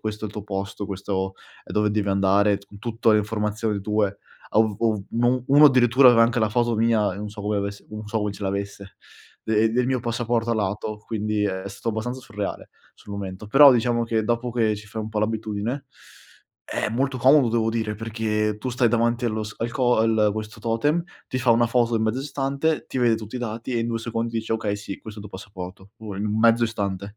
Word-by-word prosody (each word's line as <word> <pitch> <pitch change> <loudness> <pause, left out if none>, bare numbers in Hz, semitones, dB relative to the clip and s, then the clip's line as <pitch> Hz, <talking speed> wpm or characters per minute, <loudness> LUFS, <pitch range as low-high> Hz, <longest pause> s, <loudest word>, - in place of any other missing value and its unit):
questo 110 0 -4
è - - -1
il - - -12
tuo 105 -2 -6
posto, 100 0 -4
questo 95 -1 -3 0.3
è - - -9
dove 105 0 +2
devi 105 -1 0
andare", 100 +1 +3
con 100 - -15
tutto 115 +1 0
le 105 - +5
informazioni 105 0 -2
tue. 105 -1 0 0.3
Ov 110 -2 +2
ov 110 -3 +1
un 120 +2 +1
uno 145 +2 +7
addirittura 125 -1 +6
aveva 115 -1 +6
anche 120 +2 +2
la 110 - +2
foto 120 +1 +1
mia, 110 -3 +2
e - - -8
non 105 +1 -5
so 105 -1 -9
come 105 0 -1
avesse 100 0 -4
non 110 0 -8
so 110 +1 -1
come 105 -1 -2
ce 100 - -10
l'avesse, 100 0 -4 0.5
de 110 0 +2
del 125 +1 +1
mio 130 0 +1
passaporto 120 -1 -1
a - - +2
lato, 105 0 -2
quindi 105 -1 -1
è 95 -1 -2
stato 100 +4 -6
abbastanza 120 +4 -3
surreale, 105 -4 -5 0.3
sul 100 - -12
momento. 100 0 -6
Però 140 +7 +8
diciamo 120 0 +1
che, 110 -1 0
dopo 120 +1 -1
che 110 -3 +1
ci 105 - -11
fai 105 +2 -6
un 110 - -5
po' 110 - -3
l'abitudine, 110 +4 -2 0.8
è - - -2
molto 130 +3 0
comodo 130 +1 +5
devo 115 -1 +1
dire, 110 -2 -2
perché 105 -1 -1
tu 115 - -4
stai 120 -1 +2
davanti 120 +1 +1
allo 110 -2 -1
s 105 -1 -7
al 115 +1 -2
co 125 -1 +2
al 110 -2 +3
questo 110 0 -6
totem, 145 +9 +1 0.3
ti 130 - -2
fa 125 -1 +2
1 115 +1 +4
foto 120 -1 +2
in 110 - 0
mezzo 110 +4 0
istante, 140 +2 -1
ti 130 - -4
vede 120 -2 +4
tutti 110 +3 -7
i - - -4
dati 115 +1 -4
e - - +1
in 115 - -1
2 115 -1 -1
secondi 115 0 -3
dice: 110 0 -3
"Okay 110 -2 -1
sì, 100 -1 -7
questo 110 -1 -10
è - - -9
il 105 - -9
tuo 95 - -8
passaporto", 95 0 -9
o 110 -2 -7
in 105 +2 -2
mezzo 115 +1 +5
istante. 100 -2 -4
110 Hz, 225 wpm, -24 LUFS, 105-120 Hz, 0.8 s, Però